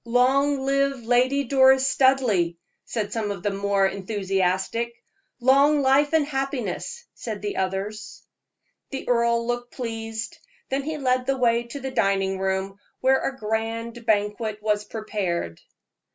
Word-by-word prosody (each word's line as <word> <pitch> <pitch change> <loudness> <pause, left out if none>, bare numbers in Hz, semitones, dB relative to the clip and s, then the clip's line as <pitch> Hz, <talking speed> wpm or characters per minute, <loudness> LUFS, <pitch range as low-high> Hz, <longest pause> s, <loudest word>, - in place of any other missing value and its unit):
"Long 265 +4 +2
live 275 -2 +1
Lady 255 +4 +2
Doris 265 0 +5
Studleigh!" 255 -11 +3 0.3
said 210 -3 -3
some 220 -2 -2
of 195 -3 -5
the 205 - +1
more 200 0 +1
enthusiastic. 195 +3 -1 0.4
"Long 280 +3 +4
life 275 +2 +4
and 315 -2 +4
happiness!" 275 - -3
said 215 -4 -6
the 205 - -3
others. 195 +4 -4 0.7
The 270 - -6
earl 235 -1 +2
looked 245 0 -3
pleased, 225 -2 -5 0.3
then 270 +1 0
he 310 +2 -4
led 255 -2 0
the 270 0 +1
way 235 -1 +2
to 280 +4 -7
the 265 0 -5
dining 195 -3 +1
room, 190 +1 -2 0.2
where 265 +1 +4
a 270 - -3
grand 225 +1 -3
banquet 210 0 0
was 210 -1 0
prepared. 190 - -3
235 Hz, 140 wpm, -24 LUFS, 205-265 Hz, 0.7 s, Doris